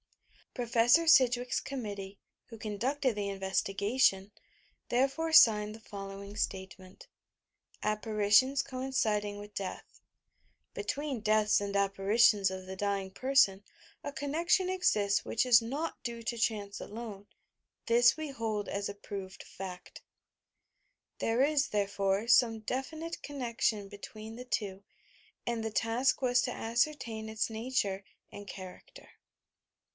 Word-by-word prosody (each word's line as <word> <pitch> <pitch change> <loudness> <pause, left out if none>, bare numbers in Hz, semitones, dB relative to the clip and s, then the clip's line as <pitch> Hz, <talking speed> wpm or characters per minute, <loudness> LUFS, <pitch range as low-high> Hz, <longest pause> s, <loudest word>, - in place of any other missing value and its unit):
Prof. 240 -2 -5 0.3
Sidgwick'a 250 -5 +4
Committee, 205 -7 -6 0.3
who 225 - -10
conducted 240 +5 -1
the 205 -1 -2
investigation, 195 +2 +1 0.6
therefore 275 +6 +1
signed 215 -7 +6
the - - -12
following 200 -1 -8
statement: 190 -2 -5 0.8
APPARITIONS 215 +5 +3
COINCIOING 220 -6 -1
WITH 205 0 -10
13EATH 190 -2 -4 0.9
"Between 285 -5 -3
deaths 215 0 +3
and 200 0 -3
apparitions 200 +1 +3
of 185 0 -6
the 190 0 -7
dying 195 -1 -2
person 255 -5 +3 0.4
a 285 - -4
connnection 330 +7 +1
esists 210 - +2
which 230 - 0
is 240 -2 +7
not 280 +8 -4
due 235 -1 -5
to 235 +1 -3
chance 210 -3 -1
alone. 210 -2 -8 0.6
This 240 +3 +5
we 310 -1 -4
hold 220 -6 -3
as 200 0 -3
a 200 - -6
proved 195 -2 -8
fact." 185 -2 -9 1.2
There 230 +3 +2
is, 290 -1 +2
therefore, 200 0 0
some 235 -2 +4
definite 315 +8 -4
connection 235 -7 -2
between 215 +2 -9
the 250 +1 -8
two, 200 -5 -3 0.6
and 235 -2 -2
the 220 - -3
task 230 +6 +1
was 245 -1 +3
to - - -2
ascertain 230 -2 -1
its 220 +1 -1
nature 220 -4 -1 0.3
and 205 0 -10
character. 185 - -10
220 Hz, 120 wpm, -31 LUFS, 200-250 Hz, 1.2 s, is